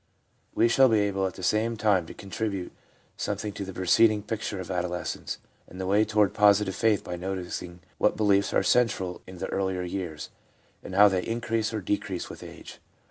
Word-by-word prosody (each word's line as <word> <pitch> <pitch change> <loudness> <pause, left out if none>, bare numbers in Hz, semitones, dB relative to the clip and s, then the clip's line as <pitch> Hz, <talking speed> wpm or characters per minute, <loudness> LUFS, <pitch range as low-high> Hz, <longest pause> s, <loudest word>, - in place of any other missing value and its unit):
We 115 - +4
shall 130 +2 +5
be 110 - +3
able 100 -1 0
at 95 - -7
the 95 - -9
same 110 +5 +1
time 100 -5 +2
to - - -10
contribute 100 -2 -4 0.5
something 105 -1 -3
to 100 - -5
the 95 - -6
preceding 105 +4 +3
picture 105 -2 -4
of 95 - -7
adol 90 -1 -2
escence, - - -5 0.3
and 90 - -11
the 95 - -3
way 100 +3 +3
toward 105 -2 +2
positive 100 -1 +4
faith 110 -2 +2
by 90 - -5
noticing 90 -1 -5 0.2
what - - +2
beliefs 100 -2 +3
are - - +2
central 95 -7 +1
in 95 0 -10
the - - -4
earlier 95 -2 -1
years, 90 -4 -5 0.5
and 95 - -8
how 105 +1 +8
they 95 -2 +1
increase 115 0 -1
or 110 -2 -3
decrease 95 -1 -3
with - - -11
age. - - -11
100 Hz, 190 wpm, -27 LUFS, 90-110 Hz, 0.5 s, how